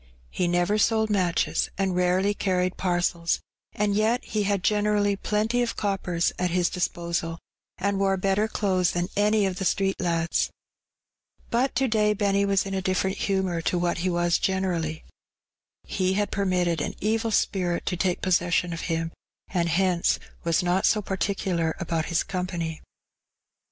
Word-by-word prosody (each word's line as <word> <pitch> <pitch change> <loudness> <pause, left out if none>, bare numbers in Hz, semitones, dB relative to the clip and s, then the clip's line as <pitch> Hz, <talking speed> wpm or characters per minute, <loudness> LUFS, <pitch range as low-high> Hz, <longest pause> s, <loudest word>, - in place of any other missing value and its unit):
He 180 - 0
never 175 +4 +1
sold 220 0 +2
matches, 180 -4 +1
and 190 -2 0
rarely 180 +3 +2
carried 185 -2 0
parcels, 175 -2 0 0.3
and 210 -1 0
yet 225 +4 +1
he 215 - -1
had 200 -2 0
generally 210 -1 +2
plenty 215 +4 0
of 240 - -1
coppers 190 -4 0
at 180 0 +1
his 175 0 +1
disposal, 170 -2 -2 0.4
and 200 +1 0
wore 195 -1 +2
better 195 +3 +1
clothes 185 -5 +1
than 175 0 -1
any 210 0 +3
of 185 -1 -2
the - - -2
street 195 +1 +1
lads. 170 -2 0 1.0
But 250 +3 +1
to 265 +2 +2
day 210 -2 +2
Benny 200 -1 +2
was 200 0 +2
in 195 - -4
a 190 - -1
different 190 +1 0
humour 190 -4 0
to 175 - 0
what 175 0 0
he 185 +2 0
was 175 -1 +1
generally. 175 -5 -1 0.8
He 185 -1 0
had 205 +1 0
permitted 180 -5 0
an - - -3
evil 225 +2 0
spirit 180 -5 0
to 180 - -1
take 180 0 -1
possession 175 -1 +1
of 165 - -5
him, 165 0 -1 0.4
and 170 -3 0
hence 175 0 +2 0.3
was 165 +2 +1
not 180 +2 +2
so 210 -1 +2
particular 190 -4 -1
about 165 -3 -1
his 170 -2 0
company. 175 -3 -3
185 Hz, 160 wpm, -26 LUFS, 175-200 Hz, 1.0 s, any